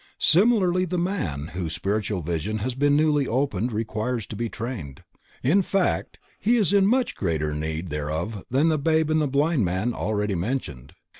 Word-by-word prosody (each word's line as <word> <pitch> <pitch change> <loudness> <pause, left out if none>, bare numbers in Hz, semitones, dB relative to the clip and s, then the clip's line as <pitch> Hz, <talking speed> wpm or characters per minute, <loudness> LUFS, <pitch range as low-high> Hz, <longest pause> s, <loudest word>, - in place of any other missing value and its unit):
Similarly 185 -1 +4
the 180 0 -2
man 135 - -2
whose 85 -3 -3
spiritual 100 +1 -2
vision 85 +6 -2
has 120 +5 -2
been 145 +3 +2
newly 150 -2 +3
opened 120 -3 0
requires 110 +1 -2
to - - -8
be 115 +2 -2
trained, 110 - -6 0.4
in 170 +10 +4
fact 195 0 0 0.2
he 230 +5 +3
is 205 -5 +2
in 195 -1 +5
much 250 +3 +2
greater 80 -5 -1
need 80 +3 -3
thereof 80 +8 -3
than 140 +6 +3
the 155 -2 +1
babe 160 +1 +2
and 155 0 +3
the 150 - +1
blind 140 0 +2
man 95 +7 0
already 105 -1 -1
mentioned. 85 - -4
115 Hz, 170 wpm, -25 LUFS, -, 0.4 s, in